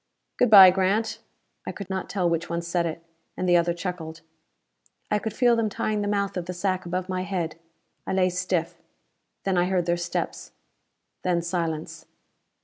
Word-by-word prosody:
"Good 245 - +3
by, 195 -3 +10
Grant." 195 +4 0 0.5
I - - -1
could 200 - -8
not 190 -1 -4
tell 185 -3 0
which 170 0 -1
one 170 0 -2
said 170 0 0
it. 165 +1 -6 0.3
And 185 - -1
the 175 - +5
other 170 0 +3
chuckled. 170 -2 -5 0.9
I 210 - +3
could 220 - -4
feel 240 +2 +3
them 225 -2 0
tying 210 +1 -1
the 205 - -2
mouth 200 -1 -1
of 175 -1 -4
the 180 - -3
sack 185 0 -1
above 180 +1 -2
my 185 -1 -2
head. 175 -4 -3 0.5
I - - -1
lay 185 -1 +2
stiff. 180 -2 -2 0.6
Then 190 -2 +1
I 175 - +3
heard 180 -2 0
their 175 0 +1
steps. 175 0 -4 0.7
Then 175 -2 0
silence. 165 -3 -3
180 Hz, 180 wpm, -25 LUFS, 170-195 Hz, 0.9 s, by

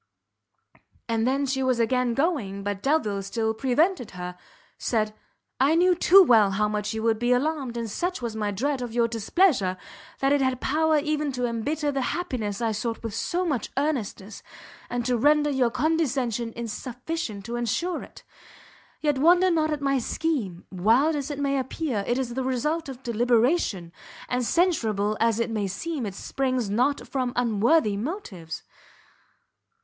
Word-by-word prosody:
And 225 0 0
then 275 +2 +1
she 265 0 -1
was 255 -2 +1
again 245 0 +1
going, 240 - -1
but 200 -1 -3
Delvile 220 -9 +1
still 220 +3 -1
preventing 265 - +1
her, 180 0 -5 0.4
said 215 -2 0 0.5
"I 280 +5 +4
knew 360 +2 +5
too 375 +2 +7
well 225 - +5
how 205 +2 +1
much 210 0 -2
you 220 - -3
would 225 -1 +2
be 240 +1 +1
alarmed, 265 -2 0
and 230 -1 -3
such 355 - -2
was 235 -3 -4
my 210 -1 -1
dread 260 +7 -1
of 240 -2 -5
your 235 -1 +3
displeasure 230 - +2 0.4
that 275 +1 +2
it 285 - +2
had 260 -1 +1
power 315 +3 +2
even 300 -1 0
to 250 -1 -1
embitter 290 +6 -1
the 275 -1 -1
happiness 245 - -3
I 225 - +1
sought 225 +2 -3
with 225 -2 -4
so 350 - -1
much 280 -10 -1
earnestness, 235 -8 -2 0.5
and 245 -1 -2
to 250 0 +2
render 295 +4 +3
your 260 -3 +2
condescension 255 -6 0
insufficient 235 - -5
to 235 +1 -4
ensure 240 - -1
it. - - -13 0.8
Yet 295 -3 +1
wonder 355 +5 +5
not 315 -2 +2
at 300 -1 -2
my 275 -1 +1
scheme; 235 - -2
wild 230 - +3
as 285 -1 -3
it 290 - -4
may 275 -1 0
appear, 260 -4 -2
it 240 - +1
is 255 -3 -2
the 260 +1 -2
result 280 +5 -1
of 265 -1 -9
deliberation, 235 - +1 0.3
and 250 0 -1
censurable 225 - +1
as 230 -1 +2
it 230 0 -1
may 210 -3 -1
seem, 265 - -3
it 195 - -6
springs 255 -3 -2
not 250 +7 +1
from 255 -2 -2
unworthy 230 0 +2
motives." 205 - -5
250 Hz, 165 wpm, -25 LUFS, 220-295 Hz, 0.8 s, too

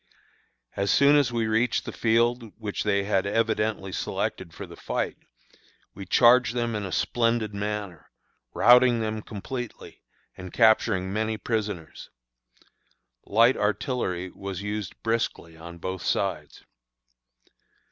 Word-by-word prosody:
As 100 0 -1
soon 140 +5 +5
as 140 -4 +3
we 115 -1 0
reached 115 +2 +1
the - - -5
field 115 0 +1
which 105 -3 -4
they 100 -1 +1
had 100 -1 0
evidently 110 -2 0
selected 85 - -3
for - - -8
the - - -12
fight, - - -3 0.8
we 100 -2 -9
charged 120 +2 +5
them 120 -1 -1
in 105 -1 -3
a 95 - -5
splendid 115 -1 0
manner, 100 -4 -5 0.4
routing 125 0 +5
them 110 0 -3
completely, 120 +4 -7 0.3
and 95 -1 -9
capturing 110 -4 +3
many 110 +1 -1
prisoners. 105 -8 -4 1.2
Light 115 +5 +4
artillery 105 -4 -2
was 100 0 -6
used 105 -1 -4
briskly 115 -7 -2
on 85 +1 -10
both 95 +2 -5
sides. - - -2
110 Hz, 125 wpm, -26 LUFS, 100-115 Hz, 1.2 s, soon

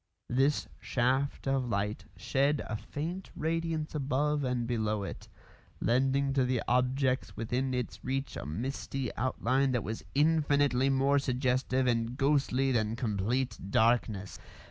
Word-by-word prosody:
This 135 +4 +2
shaft 130 +3 0
of 135 -2 +1
light 100 -1 -2
shed 140 +5 +1
a 110 - -3
faint 165 - -5
radiance 165 -1 -1
above 145 +1 0
and 125 -2 0
below 110 -3 -1
it, - - -7 0.5
lending 135 +3 +2
to 135 -1 +3
the 125 -2 0
objects 130 +1 +1
within 125 +3 -1
its 125 -2 -4
reach 135 +1 -2
a - - -5
misty 130 - -3
outline 130 +2 +1
that 120 -4 0
was 110 +2 -5
infinitely 145 -3 +3
more 135 +1 +3
suggestive 130 0 0
and 120 0 0
ghostly 135 -2 +2
than 110 -2 +1
complete 115 +2 -1
darkness. 110 -3 +1
130 Hz, 130 wpm, -31 LUFS, 120-140 Hz, 0.5 s, to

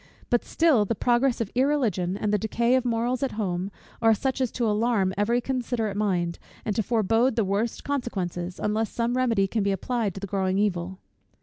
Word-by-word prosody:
But 240 - +3
still, 315 -10 +3
the 215 +3 -1
progress 240 +2 +2
of 220 - -3
irreligion, 240 - +1
and 210 0 -1
the 210 - +3
decay 235 +4 +1
of 260 -1 +3
morals 240 +2 0
at 275 - -1
home, 190 -3 -2 0.3
are 225 -1 +5
such 265 +4 -2
as 255 - 0
to 240 - -1
alarm 210 -3 +1
every 225 +4 +2
considerate 240 -5 -2
mind, 180 -5 0 0.3
and 210 - -1
to 220 - +2
forebode 225 +3 +2
the 225 - +2
worst 205 +4 -1
consequences, 185 -10 -3
unless 215 +1 0
some 235 +1 -1
remedy 235 -6 +2
can 215 +3 -1
be 200 0 +1
applied 210 0 -1
to - - -5
the 200 - -4
growing 190 -1 0
evil. 190 -3 -1
220 Hz, 195 wpm, -26 LUFS, 195-245 Hz, 0.3 s, are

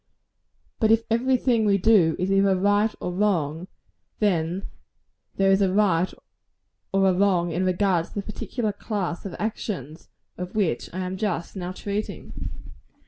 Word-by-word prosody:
But 220 - +3
if 225 0 +4
every 255 +3 +3
thing 235 -3 +2
we 200 -2 +3
do 185 -5 +4
is 185 +2 -1
either 195 0 +4
right 205 +3 +3
or 180 - -3
wrong, 175 -4 0 0.5
then 180 -2 0 0.7
there 195 0 +3
is 195 +1 +4
a 190 -2 +3
right 185 -3 +2 0.8
and 195 0 +3
a 190 - +4
wrong 180 -2 +2
in 175 +3 -1
regard 185 -2 +2
to - - -17
the 200 - -2
particular 215 +1 -3
class 200 -3 -3
of 185 - -7
actions 180 - -4 0.3
of 180 +2 -6
which 200 -7 0
I 185 - -4
am 185 +1 -3
just 190 -4 -2
now 180 -1 -4
treating. 200 +3 -5
195 Hz, 155 wpm, -25 LUFS, 180-210 Hz, 0.8 s, if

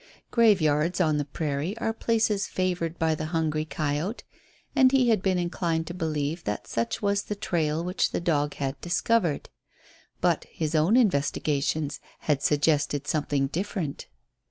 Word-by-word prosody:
Graveyards 175 -7 +3
on 155 -4 +3
the 145 - -1
prairie 150 +6 -3
are 225 -1 -1
places 220 -3 +1
favoured 175 -3 -1
by 160 -1 +2
the 155 0 -3
hungry 155 -2 0
coyote, 155 - -2 0.5
and 260 -2 +6
he 260 -3 +4
had 220 -5 +3
been 190 -1 +1
inclined 170 -2 -1
to 175 - -6
believe 160 -1 -2
that 105 - -3
such 115 - -2
was 200 0 +2
the 210 - -5
trail 165 -6 -1
which 180 +2 0
the - - -2
dog 150 -4 0
had 135 -1 -3
discovered. 175 -2 +1 0.7
But - - +1
his 155 -1 -4
own 165 +9 +4
investigations 145 - +1 0.2
had 145 -3 +1
suggested 145 -1 +1
something 145 -2 0
different. 170 0 -3
160 Hz, 150 wpm, -27 LUFS, 150-190 Hz, 0.7 s, and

